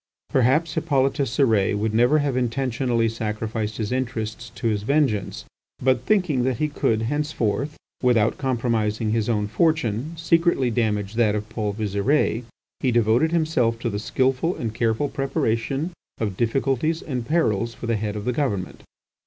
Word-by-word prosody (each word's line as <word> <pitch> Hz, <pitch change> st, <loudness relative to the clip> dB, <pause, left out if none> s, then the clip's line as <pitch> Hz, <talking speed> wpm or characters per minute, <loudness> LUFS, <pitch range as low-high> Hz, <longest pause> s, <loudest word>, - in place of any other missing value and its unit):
Perhaps 135 Hz, +6 st, +2 dB
Hippolyte 135 Hz, -2 st, +1 dB
Cérès 110 Hz, -6 st, +2 dB
would 110 Hz, +1 st, -1 dB
never 120 Hz, +7 st, +4 dB
have 145 Hz, -3 st, 0 dB
intentionally 125 Hz, -1 st, 0 dB
sacrificed 110 Hz, -1 st, -3 dB
his 110 Hz, -1 st, -3 dB
interests 120 Hz, -3 st, -3 dB
to -, -, -7 dB
his 105 Hz, -3 st, +1 dB
vengeance. 130 Hz, -4 st, 0 dB, 0.3 s
But 130 Hz, 0 st, +1 dB
thinking 180 Hz, -11 st, +2 dB
that 130 Hz, -2 st, 0 dB
he 150 Hz, +3 st, 0 dB
could 115 Hz, -6 st, 0 dB
henceforth, 145 Hz, 0 st, -1 dB, 0.2 s
without 115 Hz, -3 st, +2 dB
compromising 115 Hz, -4 st, 0 dB
his 115 Hz, 0 st, 0 dB
own 105 Hz, -3 st, +1 dB
fortune, 150 Hz, +1 st, 0 dB
secretly 165 Hz, -6 st, +2 dB
damage 105 Hz, -4 st, 0 dB
that 110 Hz, -2 st, +2 dB
of 105 Hz, 0 st, -3 dB
Paul 110 Hz, -2 st, -2 dB
Visire, 110 Hz, +4 st, +1 dB, 0.4 s
he 130 Hz, -, +1 dB
devoted 120 Hz, +6 st, +3 dB
himself 155 Hz, -9 st, +1 dB
to 120 Hz, -, -1 dB
the 105 Hz, -, -2 dB
skilful 130 Hz, -, 0 dB
and 115 Hz, -2 st, -4 dB
careful 115 Hz, +4 st, 0 dB
preparation 135 Hz, +3 st, -1 dB, 0.3 s
of 105 Hz, -4 st, -2 dB
difficulties 135 Hz, -, 0 dB
and 125 Hz, -5 st, -4 dB
perils 115 Hz, -9 st, +1 dB
for -, -, -7 dB
the 115 Hz, -1 st, +1 dB
Head 105 Hz, 0 st, -3 dB
of 105 Hz, 0 st, -5 dB
the 125 Hz, -, 0 dB
Government. 110 Hz, -10 st, -2 dB
120 Hz, 155 wpm, -23 LUFS, 110-135 Hz, 0.4 s, never